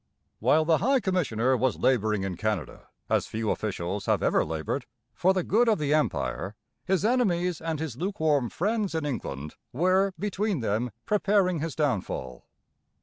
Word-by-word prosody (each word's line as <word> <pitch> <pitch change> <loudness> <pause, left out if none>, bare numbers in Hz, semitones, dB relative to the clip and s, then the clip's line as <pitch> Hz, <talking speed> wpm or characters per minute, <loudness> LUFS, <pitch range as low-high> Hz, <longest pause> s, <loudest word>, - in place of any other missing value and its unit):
While 150 +7 +3
the 160 -2 +3
High 265 - +3
Commissioner 130 - +1
was 125 0 +1
labouring 110 -5 +2
in 95 -2 -3
Canada, 105 0 -3 0.2
as - - +1
few 110 -1 -2
officials 100 -1 -3
have - - +2
ever - - +3
laboured, 80 - -3 0.3
for 180 +11 +3
the 185 -2 0
good 230 +6 +3
of 220 - +3
the 150 -2 0
Empire, 110 -8 -1 0.3
his 190 0 +1
enemies 180 -8 +1
and 160 -2 -2
his 155 -6 -4
lukewarm 155 - +1
friends 205 - -1
in 160 -2 -1
England 75 - -4 0.2
were 185 +6 +2
between 205 - -1
them 110 +3 0 0.2
preparing 200 -4 +2
his 160 0 -3
downfall. 95 - -2
155 Hz, 155 wpm, -27 LUFS, -, 0.3 s, While